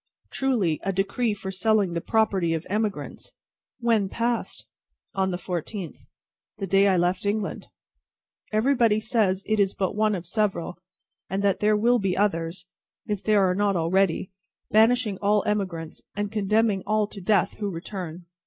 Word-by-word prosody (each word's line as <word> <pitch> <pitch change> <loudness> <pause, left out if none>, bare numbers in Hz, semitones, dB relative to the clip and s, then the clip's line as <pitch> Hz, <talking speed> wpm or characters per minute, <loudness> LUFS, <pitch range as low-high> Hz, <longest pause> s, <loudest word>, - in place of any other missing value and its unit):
"Truly, 225 - +1
a 195 - -1
decree 205 +4 0
for 190 -1 -6
selling 195 -1 +1
the 170 - -2
property 195 -7 +1
of 160 - -5
emigrants." 210 -1 -3 0.5
"When 225 -5 +2
passed?" 235 +2 -2 0.5
"On 190 -1 0
the 180 - -2
fourteenth." 180 +1 -5 0.5
"The 195 - -3
day 195 +2 +4
I 190 -2 +3
left 180 +2 +1
England!" 205 0 -2 0.8
"Everybody 225 -1 +3
says 215 -4 +1
it 215 -1 0
is 195 -1 +2
but 190 +1 -1
one 215 0 +2
of 180 -2 -6
several, 180 -3 -1 0.5
and 195 +2 -2
that 200 -2 +2
there 210 0 +3
will 240 +3 +3
be 195 -3 -1
others 170 -3 -1 0.4
if 205 -2 -3
there 205 -3 +4
are 180 - +2
not 200 +1 +1
already 180 +2 +1 0.4
banishing 220 -1 +3
all 205 0 +2
emigrants, 185 -7 -3
and 205 0 -2
condemning 210 -1 +1
all 215 0 +2
to 205 -1 -10
death 195 0 +1
who 205 -2 -1
return. 175 -1 -6
200 Hz, 155 wpm, -25 LUFS, 185-215 Hz, 0.8 s, day